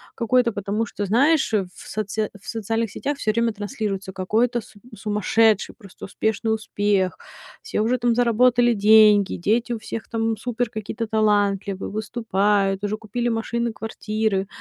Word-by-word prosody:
какое-то, 235 -1 +2
потому 205 +3 -2
что, 205 -1 -4
знаешь, 270 - +3
э, 205 - +3
в - - -12
соце 215 0 -2
в - - -17
социальных 225 0 -2
сетях 285 0 -3
всё 215 - 0
время 230 +1 +1
транслируется 205 -3 -4
какой-то 225 +6 0
с 215 - -18 0.2
сумасшедший, 210 +1 +1
просто 200 -6 -11
успешный 220 +2 -1
успех, 205 -3 0 0.5
все 445 - -2
уже 240 +3 +1
там 240 -1 +1
заработали 240 0 +3
деньги, 210 -1 +5
дети 230 +6 0
у - - -2
всех 220 +1 -6
там 225 -1 -1
супер 245 +1 -2
какие-то 220 +1 -4
талантливые, 205 -3 +1
выступают, 205 -3 0
уже 205 +1 -1
купили 230 +3 -3
машины, 235 0 -2
квартиры. 215 -3 -2
220 Hz, 150 wpm, -23 LUFS, 205-230 Hz, 0.5 s, деньги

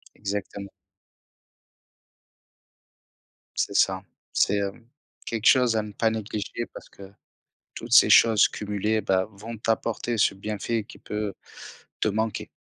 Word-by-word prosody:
Exactement. 100 -1 -5 2.9
C'est 100 - -1
ça, 95 -1 +2 0.3
c'est, 100 0 +2
hum, 105 +4 -7 0.4
quelque 115 -2 -4
chose 125 -4 +5
à 110 - +1
ne 105 - -8
pas 110 +2 +1
négliger 110 +1 -4
parce - - -11
que 95 -1 -13 0.6
toutes - - -8
ces - - +8
choses 110 -3 +6
cumulées, 105 +1 -2
ben 95 -2 +1
vont 110 +4 -8
t'apporter 115 +2 -1
ce 100 - +3
bienfait 105 +3 -3
qui - - -14
peut 105 -2 -4 0.7
te - - +2
manquer 110 +1 -2
105 Hz, 125 wpm, -25 LUFS, 100-110 Hz, 2.9 s, ces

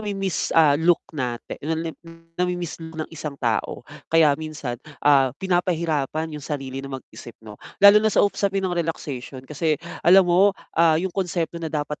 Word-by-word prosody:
namimiss, 195 -4 -2
ah, 155 -3 +6
look 165 +4 +2
natin, 125 -5 -5
lalo 160 +2 -2
na 165 - -3
'yong 165 -1 -15 0.2
nami-miss 175 -1 -3
look 160 0 -9
ng - - -16
isang 150 -3 -6
tao. 120 -1 -2 0.2
Kaya 160 -3 +5
minsan, 150 -6 -6 0.2
ah, 140 -2 +5
pinapahirapan 160 -4 -1
'yong 150 - -6
sarili 135 -2 -5
na 135 - -8
mag-isip, 120 -2 -13
'no. 105 -1 -12 0.2
Lalo 205 +1 +9
na 220 - +2
sa 205 - +3
usapin 195 -1 -1
ng 185 - -1
relaxation, 145 -6 -4
kasi, 150 +2 -1 0.2
alam 185 +2 +6
mo, 185 +3 +3 0.2
ah, 165 -1 +4
'yong 180 +3 -2
konsepto 170 -3 -2
na 160 - -3
dapat 150 -1 -4
160 Hz, 175 wpm, -23 LUFS, 145-175 Hz, 0.2 s, Lalo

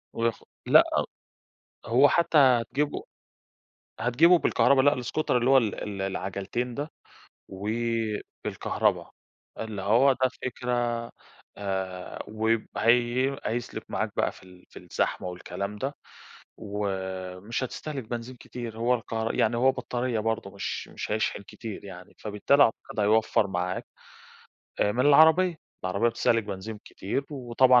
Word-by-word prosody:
وف 115 -1 -1 0.2
لأ، - - +8 1.0
هو 130 +5 +5
حتى 170 0 +3
هتجيبه 135 +2 +3 1.0
هتجيبه 160 +10 +5
بالكهربا 140 -3 +4
لأ 145 -2 +3
الscooter 155 +6 -2
اللي 125 +1 +3
هو 135 - +7
ال 110 -5 0
ال 100 -2 -4
العجلتين 100 +5 -3
ده، 145 +4 -4 0.6
و 95 +2 -6 0.8
بالكهربا - - 0 0.5
اللي 110 -3 -4
هو 115 +8 +5
ده 130 0 +1
فكرة 125 0 -2 0.8
آآ 95 -2 -4
وب 110 +1 0
هي 120 +4 +3
هيسلك 120 +2 -3
معاك - - -1
بقى - - +1
في - - -17
ال 90 -1 -16
في - - -11
الزحمة - - -2
والكلام 100 +3 -5
ده 135 +6 -3 0.6
ومش 95 +1 -4
هتستهلك 140 +1 -5
بنزين 120 +2 -6
كتير، 120 -2 -8
هو 120 +2 +2
الكهر 115 -1 -3
يعني 115 +1 +2
هو 130 +2 +5
بطارية 125 -2 -2
برضه 110 -2 -2
مش 100 - -4
مش - - -6
هيشحن 105 -1 -1
كتير 110 +1 -8
يعني 90 -2 -11
فبالتالي 110 +7 +3
أعتقد 110 - -1
هيوفر 110 0 +3
معاك 90 0 -2 1.0
آآ 105 - +3
من 125 +5 +2
العربية، 160 +4 +6 0.3
العربية 100 +6 +2
بتستهلِك 115 -1 +1
بنزين 105 +2 -6
كتير، 120 +8 -3
وطبعًا 125 -2 +4
115 Hz, 130 wpm, -27 LUFS, 100-130 Hz, 1.0 s, لأ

